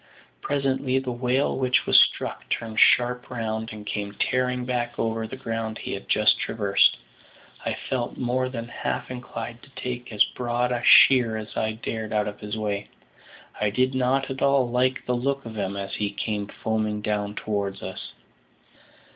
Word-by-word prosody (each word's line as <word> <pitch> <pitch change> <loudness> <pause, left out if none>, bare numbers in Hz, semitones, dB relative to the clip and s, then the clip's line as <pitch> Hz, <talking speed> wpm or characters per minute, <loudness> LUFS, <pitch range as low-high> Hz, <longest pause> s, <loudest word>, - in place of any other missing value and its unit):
Presently 135 -2 0
the 130 -1 -1
whale 125 +3 0
which 130 -1 +2
was - - +7
struck - - +1
turned 110 -2 -2
sharp 125 0 +4
round, 110 -2 -3
and 105 -1 -9
came 100 -1 -4
tearing 125 +1 0
back 120 -1 -2
over 115 0 -1
the 130 - -7
ground 115 -4 -4
he - - -5
had - - -7
just - - +4
traversed. 100 -3 +3 0.7
I - - 0
felt 125 -2 -2
more 130 +1 0
than 115 -2 -5
half 120 - -3
inclined 120 -1 -6
to 135 - -17
take 125 -1 -5
as 105 - +5
broad 125 0 -1
a 120 -1 0
sheer 120 -4 +7
as 110 0 -7
I 110 0 0
dared 110 -1 -4
out 105 -1 +1
of 105 - -6
his 105 +1 -5
way; 105 -2 -2 0.7
I 105 - +2
did 130 +5 +1
not 130 +1 +1
at 130 - -5
all 140 -2 +4
like 125 +1 +1
the 125 - 0
look 135 +2 -1
of 115 - -7
him 100 -1 -2
as 100 0 -5
he 105 -1 -1
came 105 -1 -3
foaming 110 -1 -2
down 105 -1 -1
towards 100 -2 -3
us. 95 0 -7
120 Hz, 175 wpm, -25 LUFS, 110-125 Hz, 0.7 s, was